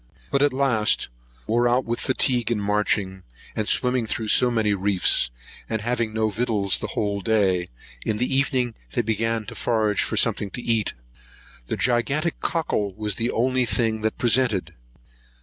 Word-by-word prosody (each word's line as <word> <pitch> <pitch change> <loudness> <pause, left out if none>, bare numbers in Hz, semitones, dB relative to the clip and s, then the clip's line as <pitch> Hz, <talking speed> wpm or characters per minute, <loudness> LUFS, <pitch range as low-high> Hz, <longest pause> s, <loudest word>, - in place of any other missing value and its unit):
But 140 - +2
at 145 0 +4
last, 130 -5 +1 0.4
wore 120 +2 +2
out 125 +2 +2
with 120 +1 -2
fatigue 125 -3 +1
in 115 -3 0
marching, 100 -2 -1 0.3
and 110 - -2
swimming 125 -2 +2
through 110 0 -3
so 125 +3 +5
many 110 -3 +1
reefs, 95 -8 +2 0.4
and 110 - -1
having 120 -1 -1
no 110 0 0
victuals 105 -3 +1
the - - -3
whole 100 -1 -1
day, 95 -4 +1 0.3
in 110 - -1
the 125 +4 0
evening 130 -3 +1 0.2
they 120 - +1
began 115 0 -1
to - - -8
forage 110 -3 0
for - - -2
something 100 - +2
to - - -5
eat. 115 -3 0 0.7
The - - -3
gigantic 135 +7 0
cockle 105 - -1
was 105 -1 -3
the 115 +1 0
only 125 +1 +1
thing 110 -2 +1
that 110 0 -1
presented. 120 -4 +1
115 Hz, 165 wpm, -23 LUFS, 105-125 Hz, 0.7 s, so